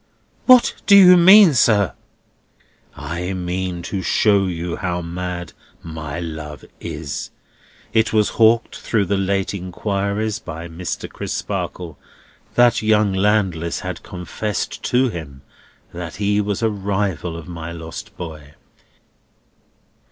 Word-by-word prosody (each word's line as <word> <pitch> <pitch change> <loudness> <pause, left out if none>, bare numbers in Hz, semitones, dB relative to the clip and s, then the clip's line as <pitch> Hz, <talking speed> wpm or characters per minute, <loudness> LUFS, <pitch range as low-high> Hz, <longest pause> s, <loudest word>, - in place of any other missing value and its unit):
"What 255 -2 +7
do 200 - +8
you 180 -2 +9
mean, 185 0 +8
sir?" 105 -6 +3 1.0
"I 90 +3 -4
mean 90 -1 -3
to 95 +1 -3
show 100 +1 +2
you 85 -1 -4
how 90 -3 -3
mad 90 0 -5 0.3
my 80 -1 -6
love 80 -3 -7
is. 70 - -5 0.6
It 110 0 +2
was 105 -2 +2
hawked 115 +1 +3
through 105 -4 0
the 100 +2 0
late 95 0 -1
inquiries 100 +3 -2
by 85 -4 -7
Mr. 85 +1 -5
Crisparkle, - - -5 0.6
that 120 -1 +4
young 110 -2 +2
Landless 95 -4 0
had 90 -2 -5
confessed 95 +3 -4
to 125 +1 +2
him 70 -8 -8 0.5
that 85 -1 -6
he 105 +1 +1
was 105 +2 -2
a 110 - +3
rival 95 -5 -2
of 85 - -10
my 85 -1 -7
lost 80 -1 -9
boy. 75 -4 -9
95 Hz, 120 wpm, -20 LUFS, 85-105 Hz, 1.0 s, you